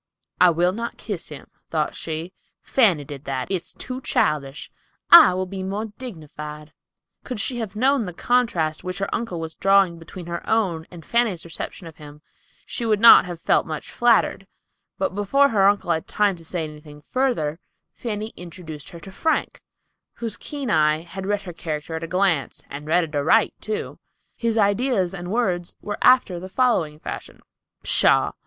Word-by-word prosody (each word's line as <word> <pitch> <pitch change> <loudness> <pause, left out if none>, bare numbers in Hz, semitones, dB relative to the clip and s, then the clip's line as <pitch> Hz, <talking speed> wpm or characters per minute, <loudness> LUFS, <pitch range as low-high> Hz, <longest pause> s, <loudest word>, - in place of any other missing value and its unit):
"I 180 - +7
will 175 +2 +2
not 230 +3 -5
kiss 205 -7 -5
him," 150 -3 -10 0.2
thought 155 -2 -1
she; 165 +3 -5 0.3
"Fanny 195 - +3
did 145 -1 -9
that. 130 +4 -3
It's 185 -1 -2
too 255 +1 -6
childish. 145 - -1 0.4
I'll 185 - +8
he 190 +1 -6
more 200 +3 -3
dignified." 150 - -8 0.5
Could 250 -5 -5
she 240 +4 -1
have 215 -3 -5
known 255 -1 +2
the - - -4
contrast 175 -12 +1
which 185 0 -4
her 195 0 -3
uncle 230 -8 -3
was 160 0 -5
drawing 195 -1 +3
between 170 +2 -10
her 170 0 -4
own 180 -8 0
and 170 -2 -12
Fanny's 235 -8 +1
reception 170 +2 -7
of 165 -1 -11
him 150 0 -13 0.4
she 240 - -5
would 215 -3 +2
not 230 -2 +9
have 175 -2 -7
felt - - +2
much 155 -1 -6
flattered; 230 -4 +2 0.5
but 190 - -1
before 275 +8 +3
her 195 -5 +4
uncle 200 -3 +2
had 160 -1 -1
time 205 -3 +1
to 165 - -14
say 165 +1 -3
anything 150 -1 -10
further, 235 - -1 0.3
Fanny 215 -1 -4
introduced 165 -4 -9
her 170 - -10
to 190 - -10
Frank, 320 +11 -1 0.5
whose 230 -3 -3
keen 280 -6 -5
eye 155 -1 +3
had 190 +3 -7
read 205 0 0
her 180 -2 -7
character 155 -1 -5
at 160 0 -4
a - - -4
glance, 180 -7 0
and 145 +2 -7
read 175 +3 +3
it 160 -2 -6
aright, 160 +10 +3
too. 215 -1 -4 0.4
His 230 -1 -1
ideas 205 -2 +2
and 175 -2 -6
words 185 -6 -1
were 205 -1 -5
after 250 -9 +4
the 185 +2 -8
following 190 -11 +1
fashion: - - -8 0.4
"Pshaw! - - +3
180 Hz, 175 wpm, -23 LUFS, 160-215 Hz, 0.5 s, not